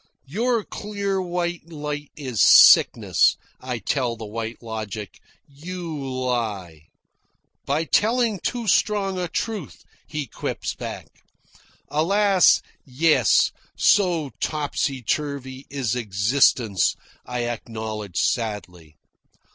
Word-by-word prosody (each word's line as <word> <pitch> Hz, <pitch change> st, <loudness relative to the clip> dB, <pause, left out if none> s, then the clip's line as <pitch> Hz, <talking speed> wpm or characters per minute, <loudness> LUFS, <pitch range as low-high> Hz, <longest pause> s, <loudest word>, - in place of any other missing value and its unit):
"Your 225 Hz, -, 0 dB
clear 200 Hz, -2 st, -3 dB
white 175 Hz, -2 st, -3 dB
light 150 Hz, -2 st, -5 dB
is 130 Hz, -7 st, -2 dB
sickness," -, -, +6 dB, 0.2 s
I 125 Hz, -1 st, -4 dB
tell 120 Hz, +3 st, -1 dB
the 110 Hz, -1 st, -8 dB
White 115 Hz, +2 st, -6 dB
Logic. 110 Hz, -5 st, -6 dB, 0.3 s
"You 165 Hz, +3 st, -7 dB
lie." 120 Hz, -, -3 dB, 0.8 s
"By 145 Hz, +4 st, +1 dB
telling 225 Hz, +3 st, +1 dB
too 235 Hz, +5 st, -3 dB
strong 195 Hz, -1 st, +1 dB
a 180 Hz, -, -2 dB
truth," 210 Hz, -1 st, -4 dB, 0.2 s
he 150 Hz, -2 st, -4 dB
quips 115 Hz, -, -4 dB
back. -, -, -7 dB, 0.8 s
"Alas, 195 Hz, +4 st, +3 dB, 0.2 s
yes, 135 Hz, -, +3 dB, 0.3 s
so 175 Hz, -8 st, +3 dB
topsy 145 Hz, -3 st, -2 dB
turvy 140 Hz, -1 st, -3 dB
is 130 Hz, -5 st, -2 dB
existence," 110 Hz, -1 st, +2 dB, 0.3 s
I 125 Hz, -1 st, -4 dB
acknowledge 110 Hz, -4 st, -5 dB
sadly. 90 Hz, -9 st, -2 dB
140 Hz, 100 wpm, -23 LUFS, 115-175 Hz, 0.8 s, sickness